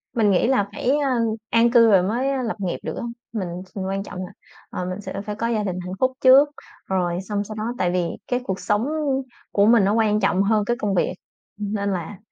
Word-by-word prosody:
Mình 215 -3 +3
nghĩ 190 - +3
là 250 -6 +2
phải, 255 - -1
a, 265 -2 +1 0.3
an 230 +1 +4
cư 230 -2 +6
rồi 190 -3 +5
mới, 240 +8 0
a, 270 -1 -1
lập 225 - -2
nghiệp 185 -3 -2
được - - -4
á. - - -4 0.3
Mình 200 -5 -2 0.2
s 185 - -16
quan 195 +1 -2
trọng 185 - -8
là, - - -11 0.4
ờ, 180 - -4
mình 185 +2 -4
sẽ 195 - -5
phải 210 -1 -4
có 230 +2 -2
gia 225 -3 0
đình 185 -3 -3
hạnh 180 - -5
phúc 260 0 +3
trước, 270 +3 +7 0.4
rồi 180 -2 -1
xong 205 +1 -2
sau 215 +1 -8
đó 215 - -4
tại 180 - +1
vì 175 -2 0 0.2
cái 245 - 0
cuộc 190 -6 -3
sống 210 +3 0 0.7
của 200 - +3
mình 225 -1 +5
nó 200 +2 +2
quan 215 -2 +2
trọng 195 -2 +2
hơn 210 0 +2
cái 240 +3 0
công 205 -3 -1
việc 180 - +1 0.4
nên 205 -1 -2
là, 180 +2 -5
205 Hz, 240 wpm, -23 LUFS, 190-230 Hz, 0.7 s, trước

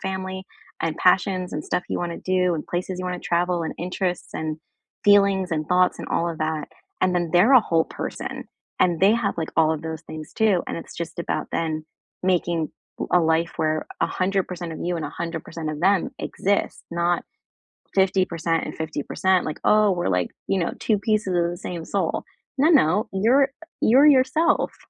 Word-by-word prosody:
family 190 0 -4 0.4
and 165 -1 -1
passions 185 0 +2
and 150 - -3
stuff 180 - -1
you - - -2
wanna 170 -1 -3
do 180 -1 +1
and 155 - -5
places 180 +1 -3
you 185 - -4
wanna 180 -1 -3
travel 175 0 0
and 160 - -4
interests 180 0 -3
and 155 -1 -3 0.5
feelings 200 -3 +4
and 155 -1 -2
thoughts 180 0 +3
and - - -6
all 170 - 0
of 160 - -7
that. 155 -1 -2 0.3
And 185 -1 +2
then 175 -2 0
they're 195 +10 +5
a 255 - +9
whole 165 -6 +1
person - - -6 0.4
and 175 -2 +3
they 195 +3 +6
have, 230 -3 0
like, 160 - -2
all 160 -1 +4
of 155 - -4
those 160 0 -5
things, 155 -1 -9
too, 210 -5 +3
and - - -4
it's 165 - -9
just 170 0 -5
about - - -2
then 155 -1 -1 0.4
making 170 -3 +1 0.4
a 180 - +6
life 160 0 +1
where 155 0 0
100% 185 -2 -1
of - - -7
you 175 0 -1
and 160 - -4
100% 165 +1 -5
of 150 - -5
them 190 +2 +3
exists, 200 +1 -1
not 170 +1 0 0.7
50% 185 -4 +1
and - - -6
50% 160 +4 0
like, 155 - -5
"Oh, 210 -1 +5
we're 175 - -1
like, 90 -2 +1 0.2
you 195 - +1
know, 170 - -1
2 215 -2 +2
pieces 210 -3 0
of 170 0 +2
the 175 - -6
same 170 -2 -5
soul." - - -1 0.3
No, 295 +5 +4
no. 210 - +4
You're 250 +8 +3 0.3
you're 265 +6 +6
yourself. 285 +4 +3
175 Hz, 185 wpm, -23 LUFS, 165-190 Hz, 0.7 s, a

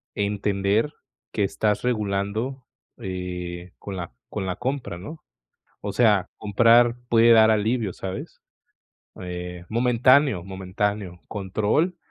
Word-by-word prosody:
entender 100 +5 0 0.4
que 105 - 0
estás 105 +1 0
regulando, 110 +3 -1 0.3
eh, 90 -1 -5
con 100 - -6
la 85 -6 -5 0.2
con 100 -3 -4
la 90 -1 -2
compra, 130 -7 -3
¿no? 150 - -9 0.6
O 100 -1 -3
sea, 105 -4 +3
comprar 115 +3 +4
puede 115 0 +5
dar 110 -1 +7
alivio, 110 -1 +1
¿sabes?, 95 0 -7 0.8
eh, 90 -1 -6
momentáneo, 125 - +3
momentáneo, 95 0 -3
control 110 - 0
105 Hz, 110 wpm, -24 LUFS, 95-115 Hz, 0.8 s, dar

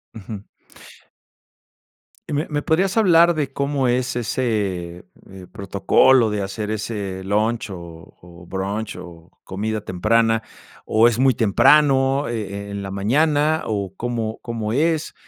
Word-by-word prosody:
Ujú. 105 -1 -8 1.9
¿Me 150 +2 -1
me 145 -2 -1
podrías 185 +6 +1
hablar 175 -5 +5
de 150 -4 -2
cómo 140 -1 -1
es 125 0 0
ese, 105 -8 -2 0.2
eh, 95 -2 -12
protocolo 110 +5 +3
de 105 -1 -2
hacer 105 +2 -4
ese 100 -3 -4
lunch, 110 +3 -1
o 95 - -7 0.4
o 85 0 -15
brunch, 100 +3 -4
o 85 -2 -12
comida 105 +3 -3
temprana? 115 +4 +1 0.4
O 110 +2 +4
es 120 -1 0
muy 130 0 +4
temprano, 135 +5 +3
eh 100 -3 -5
eh, - - -8
en 100 0 -5
la 95 - -6
mañana, 150 +9 +1
o, 100 -3 -3
¿cómo 115 -2 -3
cómo 115 -3 -4
es, 155 +5 0
110 Hz, 135 wpm, -21 LUFS, 100-135 Hz, 1.9 s, hablar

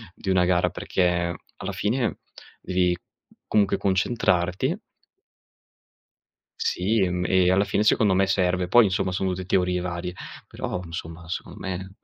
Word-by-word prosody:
di 95 - -5
una 95 -1 +4
gara 90 -1 +2
perché, 85 -2 0 0.2
alla 100 - -4
fine 105 +2 -1 0.4
devi, 90 -1 +1 0.5
comunque 100 -2 +2
concentrarti 90 -2 +1 1.8
Sì, 105 +5 +1
mhmm, 90 0 -2
e 90 -1 +3
alla 95 +2 +3
fine 105 - 0
secondo 105 -2 +3
me 95 +1 +3
serve; 90 -1 +1
poi, 120 +5 +7
insomma, 95 -1 0
sono 95 +1 -1
tutte 95 0 -4
teorie 90 0 +1
varie 90 0 -4 0.3
però, 90 - -4
insomma, 85 0 -8
secondo 85 - -6
me 95 0 -5
90 Hz, 135 wpm, -25 LUFS, 90-95 Hz, 1.8 s, poi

